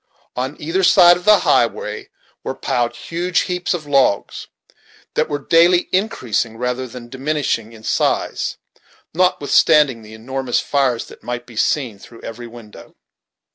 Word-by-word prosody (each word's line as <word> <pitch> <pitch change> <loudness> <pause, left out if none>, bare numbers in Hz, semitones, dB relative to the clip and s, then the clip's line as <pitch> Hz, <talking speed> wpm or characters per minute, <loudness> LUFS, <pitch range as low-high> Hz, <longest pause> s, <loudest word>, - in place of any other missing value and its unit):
On 130 +3 -4
either 170 +5 -1
side 175 -1 +7
of 175 - -9
the 210 -2 +6
highway 105 -2 0 0.3
were 130 - -4
piled 125 -3 -1
huge 175 +1 -1
heaps 180 0 -2
of 160 -4 -7
logs, 135 -8 +1 0.7
that 155 - 0
were 145 - -1
daily 170 +4 +3
increasing 125 - -1
rather 125 +1 -3
than 120 0 -10
diminishing 130 -4 -2
in 110 -1 -15
size, - - -1 0.6
notwithstanding 150 -6 +3
the 110 0 -12
enormous 130 +2 -2
fires 135 -5 0
that - - -15
might 120 0 -5
be 120 -2 -15
seen 115 -2 -1
through 115 +3 -15
every 120 +1 -8
window. 115 -2 -14
130 Hz, 140 wpm, -19 LUFS, 120-165 Hz, 0.7 s, side